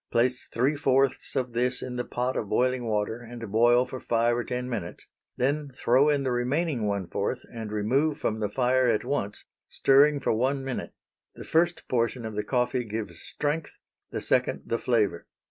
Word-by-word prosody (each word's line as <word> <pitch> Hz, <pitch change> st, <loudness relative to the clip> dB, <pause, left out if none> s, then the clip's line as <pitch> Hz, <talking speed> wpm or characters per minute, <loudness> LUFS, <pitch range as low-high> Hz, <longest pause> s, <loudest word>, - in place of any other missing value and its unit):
Place 125 Hz, +2 st, +1 dB
three 130 Hz, +6 st, +1 dB
fourths 135 Hz, -1 st, +1 dB
of 125 Hz, -2 st, -1 dB
this 125 Hz, +1 st, 0 dB
in 125 Hz, -1 st, -5 dB
the 125 Hz, -, -1 dB
pot 125 Hz, +2 st, -2 dB
of 105 Hz, -, -3 dB
boiling 125 Hz, +1 st, +1 dB
water 110 Hz, +2 st, -1 dB
and 115 Hz, -3 st, -8 dB
boil 120 Hz, +3 st, +5 dB
for 130 Hz, -, -7 dB
five 120 Hz, 0 st, +1 dB
or 120 Hz, -, -1 dB
ten 125 Hz, +1 st, -3 dB
minutes; 105 Hz, -9 st, -5 dB, 0.3 s
then 145 Hz, +3 st, 0 dB
throw 130 Hz, +4 st, +4 dB
in 145 Hz, -2 st, +2 dB
the 130 Hz, -, 0 dB
remaining 125 Hz, 0 st, 0 dB
one 100 Hz, -2 st, -1 dB
fourth -, -, -2 dB
and 110 Hz, -2 st, -6 dB
remove 135 Hz, +9 st, +1 dB
from 110 Hz, -7 st, -2 dB
the 105 Hz, -2 st, -1 dB
fire 130 Hz, +2 st, +2 dB
at 110 Hz, -3 st, +1 dB
once, 105 Hz, -8 st, -2 dB, 0.2 s
stirring 140 Hz, +2 st, +4 dB
for 135 Hz, -, +1 dB
one 135 Hz, +4 st, 0 dB
minute. 135 Hz, -2 st, -4 dB, 0.4 s
The -, -, -9 dB
first 170 Hz, +1 st, +1 dB
portion 115 Hz, -1 st, 0 dB
of 110 Hz, -, -5 dB
the 105 Hz, 0 st, -2 dB
coffee 125 Hz, +2 st, 0 dB
gives 105 Hz, -6 st, -5 dB
strength, 150 Hz, +1 st, -3 dB, 0.3 s
the -, -, -4 dB
second -, -, +1 dB
the 115 Hz, -, -1 dB
flavor. 105 Hz, -8 st, 0 dB
125 Hz, 185 wpm, -27 LUFS, 115-135 Hz, 0.4 s, boil